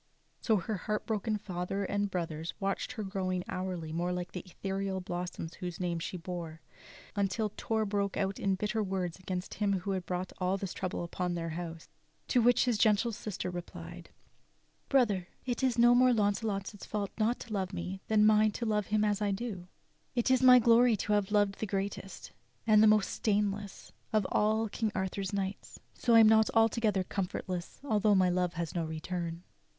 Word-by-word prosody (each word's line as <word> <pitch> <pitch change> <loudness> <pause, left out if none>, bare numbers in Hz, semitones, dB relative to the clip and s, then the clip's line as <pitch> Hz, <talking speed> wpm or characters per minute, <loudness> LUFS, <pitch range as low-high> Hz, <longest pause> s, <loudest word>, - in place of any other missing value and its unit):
So 220 - +3
her 200 +3 -3
heartbroken 215 +2 -2
father 195 0 -3
and 205 +1 -1
brothers 165 -3 -4
watched 195 +4 -2
her 220 -4 -4
growing 185 -2 -2
hourly 180 -4 -4
more 175 +2 -1
like 180 0 -4
the 180 - -5
ethereal 195 +1 -3
blossom 180 -2 -4
whose 180 -3 -5
name 175 -2 -1
she 165 +2 -4
bore, 165 -2 -6 0.6
until 200 +2 0
Torre 220 -1 -1
broke 200 -1 -1
out 195 0 -1
into 195 -1 +1
bitter 215 +3 -1
words 185 -3 -2
against 185 0 -4
him 205 -1 0
who 195 - -3
had 185 -2 -3
brought 180 +1 -3
all 185 +1 +1
this 195 -2 -5
trouble 185 -2 -3
upon 175 +1 -2
their 165 -1 -3
house. 165 0 -6 0.4
To 250 - +4
which 245 +3 +4
the 245 - +2
gentle 215 +2 +3
sister 200 -4 -4
replied: 175 0 -8 0.8
"Brother, 210 -10 +2 0.2
it 245 0 -2
is 255 -3 +1
no 240 +1 +7
more 250 0 +5
Launcelot's 205 -1 -1
fault 205 -2 -3
not 225 +3 +1
to 230 - -7
love 190 -2 -1
me 185 +1 -5
than 215 -1 +3
it - - +6
is - - +7
mine 215 0 +5
to 235 - -3
love 210 -2 0
him 215 0 +2
as 210 0 0
I 205 - +1
do. 225 +4 -2
And 180 -1 -10 0.5
it 245 +1 +2
is 260 -1 +4
my 255 -1 +9
glory 235 -1 +5
to 210 - -1
have 205 -2 +1
loved 205 -2 +2
the 220 - -2
greatest, 195 0 -4 0.3
the 215 -1 +6
most 215 -2 +4
stainless, 205 -1 -1 0.2
of 215 -3 +2
all 220 +1 +2
King 220 +1 -2
Arthur's 190 0 -2
knights; 195 -1 -4
so 235 -2 +2
I 225 - +9
am 220 - +7
not 220 0 +5
altogether 225 -3 +3
comfortless 185 -2 -4
although 215 -5 +3
my 185 -1 +4
love 180 -1 0
has 170 -2 -4
no 170 - -1
return." 165 +2 -4
195 Hz, 190 wpm, -31 LUFS, 180-215 Hz, 0.8 s, my